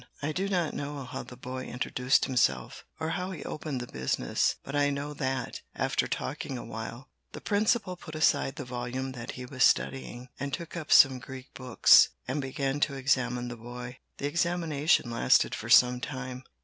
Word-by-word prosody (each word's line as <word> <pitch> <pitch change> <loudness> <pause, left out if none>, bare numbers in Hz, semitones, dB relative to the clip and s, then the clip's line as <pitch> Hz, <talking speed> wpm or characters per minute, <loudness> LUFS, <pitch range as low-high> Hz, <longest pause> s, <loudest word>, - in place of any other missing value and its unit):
I 150 - 0
do 190 +5 -2
not 175 -5 0
know 145 -1 -4
how 125 - -6
the 125 - -11
boy 130 +1 -6
introduced 125 +1 +1
himself, 65 - 0
or 160 0 -2
now 180 +3 -2
he 185 -6 -6
opened 150 -4 -4
the 120 - -9
business, 65 -1 0
but 140 - -6
I 145 0 +3
know 145 +1 -3
that, 130 -2 -3
after - - 0
talking 130 - -4
awhile, 115 +2 -7 0.2
the - - -6
principal 210 -2 +1
put 160 -3 -10
aside 145 -3 +2
the 140 - -6
volume 125 +2 -4
that 120 -2 -7
he 125 - -7
was 130 0 0
studying, 125 -2 +1
and 140 0 -3
took 170 +3 -9
up 155 -3 -5
some 135 -2 +7
Greek 130 0 -10
books, 130 -3 +6 0.2
and 135 +3 -1
began 135 +1 -2
to 140 -1 +1
examine 125 -2 0
the 120 -1 -6
boy. 125 +2 -8 0.2
The - - -4
examination 160 -4 +1
lasted 115 - +3
for - - -5
some 125 0 +6
time. 130 -2 -6
135 Hz, 180 wpm, -29 LUFS, 125-145 Hz, 0.2 s, some